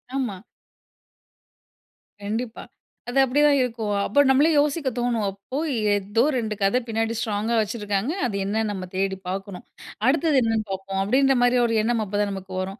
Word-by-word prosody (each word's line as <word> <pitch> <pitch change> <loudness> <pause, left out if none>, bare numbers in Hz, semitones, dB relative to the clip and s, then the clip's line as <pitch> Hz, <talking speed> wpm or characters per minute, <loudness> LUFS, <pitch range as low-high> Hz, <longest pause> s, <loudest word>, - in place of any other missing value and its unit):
ஆமா. 240 -8 -2 1.8
கண்டிப்பா. 225 +3 -4 0.5
அது 260 - -3
அப்படி 265 +3 +1
தான் 285 -1 +5
இருக்கும். 225 -4 -2
அப்ப 250 +9 +1
நம்மளே 285 +5 +5
யோசிக்க 290 -1 +1
தோணும். 235 -3 0
அப்போ 200 +7 -7 0.4
ஏதோ 205 +3 0
2 220 -3 -1
கத 195 +6 +3
பின்னாடி 225 0 -1
ஸ்ட்ராங்‌கா 220 +2 -1
வச்சிருக்காங்க. 210 +3 -2
அது 210 -5 -2
என்னன்னு 215 +1 -1
நாம 185 -2 -5
தேடி 190 0 -1
பார்க்கணும். 195 0 -6 0.4
அடுத்தது 305 +1 +3
என்னன்னு 225 -1 0
பார்ப்போம். 195 0 -4
அப்படின்ற 270 +5 +3
மாரி 245 0 +4
ஒரு 230 - 0
எண்ணம் 230 0 0
அப்பதான் 205 0 -1
நமக்கு 190 -1 -7
வரும். 195 +4 -6
220 Hz, 150 wpm, -24 LUFS, 200-250 Hz, 1.8 s, தான்